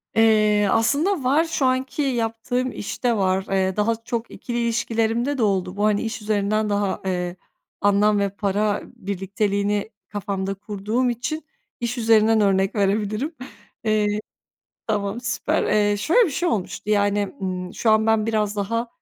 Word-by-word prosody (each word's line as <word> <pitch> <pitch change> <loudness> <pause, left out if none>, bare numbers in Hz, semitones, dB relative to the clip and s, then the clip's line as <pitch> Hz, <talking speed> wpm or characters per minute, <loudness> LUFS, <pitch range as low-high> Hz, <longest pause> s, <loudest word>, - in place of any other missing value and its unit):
Eee, 215 -2 +4
aslında 285 - +2
var, 280 +6 +3
şu 320 -5 -1
anki 260 +3 0
yaptığım 245 -1 -1
işte 235 +3 -2
var, 190 -1 +1
eee, 190 -1 +1
daha 215 +2 +1
çok 235 -1 -3
ikili 240 -1 -5
ilişkilerimde 230 +3 0
de 230 - +1
oldu. 190 -2 0
Bu, 205 - +2
hani, 210 -1 +2
iş 225 -1 -4
üzerinden 210 0 0
daha, 205 -1 0
eee, 180 -1 -2 0.5
anlam 205 +1 +3
ve 200 0 +1
para 205 +1 0
birlikteliğini 200 +1 -2 0.2
kafamda 195 -1 -3
kurduğum 210 +5 -2
için 290 +7 -3 0.3
iş 240 +1 -2
üzerinden 225 -1 +4
örnek 195 0 +2
verebilirim. 210 - 0 0.5
Eee 210 -1 +1 0.7
Tamam 210 +2 -1
süper, 230 - 0
eee, 205 -1 +2
şöyle 345 - +4
bir 315 - -3
şey 345 +6 0
olmuştu, 205 0 -3
yani, 205 -1 +2
ımm, 180 -1 -4
şu 225 - +2
an 215 0 +4
ben 220 -1 +3
biraz 215 -2 0
daha, 230 +4 -1
215 Hz, 150 wpm, -23 LUFS, 200-230 Hz, 0.7 s, Eee